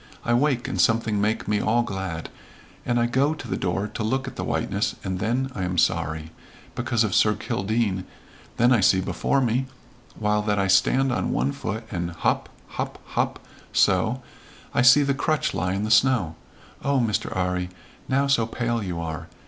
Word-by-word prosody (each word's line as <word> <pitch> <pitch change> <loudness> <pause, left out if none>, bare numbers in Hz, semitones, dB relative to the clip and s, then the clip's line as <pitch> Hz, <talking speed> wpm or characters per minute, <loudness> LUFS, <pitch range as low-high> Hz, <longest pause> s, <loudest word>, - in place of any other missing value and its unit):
I 120 - +2
wake 125 0 +2
and 95 - 0
something 110 -1 +2
make 105 +2 0
me 105 0 +1
all 115 +3 +2
glad 95 -6 -5 0.6
and 120 -1 +2
I 120 - +3
go 135 +5 +1
to 150 - -9
the - - -2
door 95 +3 -1
to - - -6
look 130 +5 -1
at - - -7
the - - -4
whiteness, - - -1
and 95 -1 -3
then 125 +5 -1
I 95 - -5
am 90 0 -2
sorry, 80 -1 0 0.4
because 115 -1 0
of 105 -4 -1
Sir 105 -1 +4
Kildene, 100 -2 -1 0.5
then 120 +2 +4
I 120 - +5
see 95 -1 +4
before 95 +9 0
me 125 +2 0 0.5
while 105 -1 +1
that 105 -1 0
I 100 - +2
stand 105 +8 +3
on 125 - -1
one 65 +3 0
foot, 110 +9 -4
and 85 -1 -2
hop 85 -1 -1 0.2
hop - - -4
hop - - -2 0.3
so, 110 +6 +2 0.5
I - - +3
see 125 +4 +7
the 140 0 +1
crutch 155 +2 0
lie 90 0 -1
in 100 - -2
the 110 - -2
snow. 110 -9 +3 0.5
Oh, 140 -1 +2
Mr. 110 -3 0
'Arry, 90 -1 -1 0.4
now 135 +1 +2
so 140 -5 +2
pale 120 0 -1
you 90 -4 -4
are! 80 -3 -5
110 Hz, 190 wpm, -24 LUFS, 95-125 Hz, 0.6 s, see